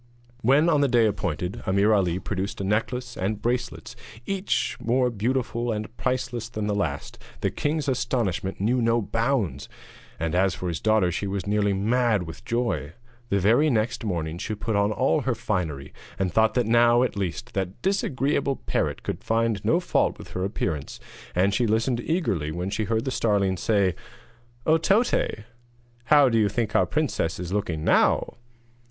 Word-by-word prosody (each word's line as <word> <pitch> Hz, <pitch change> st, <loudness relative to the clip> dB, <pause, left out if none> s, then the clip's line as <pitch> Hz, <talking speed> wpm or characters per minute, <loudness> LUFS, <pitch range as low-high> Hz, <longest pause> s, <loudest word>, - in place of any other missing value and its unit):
When, 140 Hz, +7 st, +4 dB
on 150 Hz, -4 st, +3 dB
the 140 Hz, -, +4 dB
day 120 Hz, -3 st, +4 dB
appointed, 90 Hz, -4 st, -2 dB
Ameer 100 Hz, +3 st, +3 dB
Ali 90 Hz, -4 st, +2 dB
produced 95 Hz, +1 st, -4 dB
a -, -, -2 dB
necklace 120 Hz, +5 st, -1 dB
and 100 Hz, +3 st, -2 dB
bracelets 120 Hz, +1 st, -3 dB, 0.3 s
each 195 Hz, 0 st, -1 dB
more 125 Hz, +2 st, +1 dB
beautiful 120 Hz, +1 st, -1 dB
and 110 Hz, +1 st, -4 dB
priceless 125 Hz, -3 st, -2 dB
than 110 Hz, -3 st, -4 dB
the 105 Hz, -, 0 dB
last, 80 Hz, -9 st, -3 dB, 0.2 s
the -, -, 0 dB
king's 150 Hz, 0 st, -1 dB
astonishment 120 Hz, -8 st, -1 dB
knew 120 Hz, +5 st, +1 dB
no 115 Hz, 0 st, +3 dB
bounds, 110 Hz, -, -1 dB, 0.5 s
and 80 Hz, 0 st, -2 dB
as 95 Hz, 0 st, +2 dB
for 90 Hz, -, -4 dB
his 80 Hz, -, -4 dB
daughter 110 Hz, -5 st, +3 dB
she 100 Hz, +4 st, -3 dB
was 95 Hz, -2 st, -3 dB
nearly 105 Hz, 0 st, +1 dB
mad 110 Hz, 0 st, +1 dB
with 80 Hz, -1 st, -9 dB
joy. 115 Hz, -10 st, -1 dB, 0.4 s
The 100 Hz, -, +2 dB
very 120 Hz, +11 st, +4 dB
next 115 Hz, -1 st, 0 dB
morning 85 Hz, -5 st, -3 dB
she 110 Hz, -, -3 dB
put 105 Hz, +1 st, -2 dB
on 100 Hz, +1 st, +2 dB
all 130 Hz, +7 st, +1 dB
her 130 Hz, -3 st, -1 dB
finery, 85 Hz, -11 st, -3 dB, 0.2 s
and 95 Hz, -3 st, -1 dB
thought 110 Hz, +2 st, +3 dB
that 125 Hz, -2 st, +2 dB
now, 120 Hz, +2 st, +5 dB
at 130 Hz, -, -1 dB
least, 100 Hz, +5 st, -4 dB
that 95 Hz, -2 st, -3 dB
disagreeable 140 Hz, -7 st, 0 dB
parrot -, -, -2 dB
could -, -, -4 dB
find 115 Hz, -3 st, 0 dB
no -, -, +3 dB
fault -, -, +1 dB
with -, -, -11 dB
her 90 Hz, -, -3 dB
appearance, 85 Hz, -7 st, -3 dB, 0.4 s
and 95 Hz, +3 st, +3 dB
she 120 Hz, +1 st, +2 dB
listened 115 Hz, +3 st, +1 dB
eagerly 100 Hz, -, -1 dB
when 90 Hz, +4 st, -3 dB
she 105 Hz, +1 st, -1 dB
heard 110 Hz, +4 st, -1 dB
the 130 Hz, -, -1 dB
starling 100 Hz, -6 st, +1 dB
say: 95 Hz, 0 st, +1 dB, 0.7 s
'Oh, 160 Hz, +1 st, +4 dB
Toté, 195 Hz, -, +1 dB, 0.6 s
how 145 Hz, +1 st, +6 dB
do 115 Hz, -2 st, +2 dB
you 105 Hz, -2 st, +3 dB
think 115 Hz, -1 st, -2 dB
our -, -, +4 dB
princess 145 Hz, -, -1 dB
is 90 Hz, +1 st, -5 dB
looking 85 Hz, -7 st, -2 dB
now?' -, -, +2 dB
110 Hz, 175 wpm, -25 LUFS, 95-125 Hz, 0.7 s, how